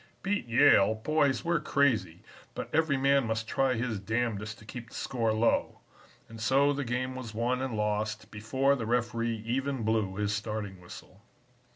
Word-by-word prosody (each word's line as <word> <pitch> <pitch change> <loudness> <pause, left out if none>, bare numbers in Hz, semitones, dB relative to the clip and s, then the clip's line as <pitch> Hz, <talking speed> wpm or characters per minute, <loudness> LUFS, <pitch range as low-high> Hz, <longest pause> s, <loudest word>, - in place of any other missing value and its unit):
'Beat 205 -7 -1
Yale! 115 -4 +5
boys, 140 +5 +1
we're 170 -1 +2
crazy, 120 - +1 0.3
but - - -6
every 155 -2 +2
man 135 -2 +3
must 110 0 -2
try 135 +1 +1
his 115 -3 -2
damnedest 110 0 -2
to 105 - -15
keep 115 +1 -8
the - - -13
score 115 -4 -1
low,' 110 +2 +1 0.5
and 115 0 -10
so 135 +5 +3
the 140 0 -2
game 130 +1 -2
was 115 -4 -7
won 125 +3 0
and 130 -4 -3
lost 105 +1 -2
before 130 +6 +1
the 115 -5 -4
referee 115 -2 -1
even 135 +1 -1
blew 110 -3 0
his 105 0 -1
starting 105 -3 -4
whistle. 90 +2 -12
115 Hz, 170 wpm, -29 LUFS, 110-135 Hz, 0.5 s, Yale